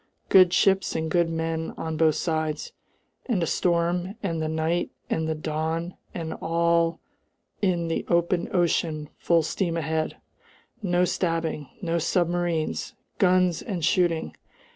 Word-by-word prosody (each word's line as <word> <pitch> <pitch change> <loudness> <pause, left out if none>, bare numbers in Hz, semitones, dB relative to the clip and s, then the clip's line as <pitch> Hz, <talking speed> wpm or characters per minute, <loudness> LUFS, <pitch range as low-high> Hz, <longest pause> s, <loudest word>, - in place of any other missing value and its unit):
Good 185 -2 +7
ships 195 +1 +3
and 160 -1 -2
good 170 0 +3
men 160 0 -2
on 160 -1 -3
both 155 -1 +3
sides, 155 -2 -2 0.6
and 210 -9 +1
a - - +2
storm 175 +3 0
and 165 -4 -1
the 155 - -1
night 160 +2 0 0.2
and 160 0 0
the 160 - -1
dawn 160 +3 -2 0.2
and 165 -2 -4
all 170 0 +2 0.6
in 175 -4 +1
the 165 - -1
open 170 0 +1
ocean 160 -4 0
full 170 -1 +3
steam 170 +1 -1
ahead! 160 0 -1 0.6
No 180 -2 +2
stabbing! 165 -5 -1
No 170 -1 0
submarines! 175 -1 0 0.2
Guns 180 -2 +3
and 180 -7 -2
shooting! 175 -3 +1
170 Hz, 135 wpm, -26 LUFS, 160-175 Hz, 0.6 s, Good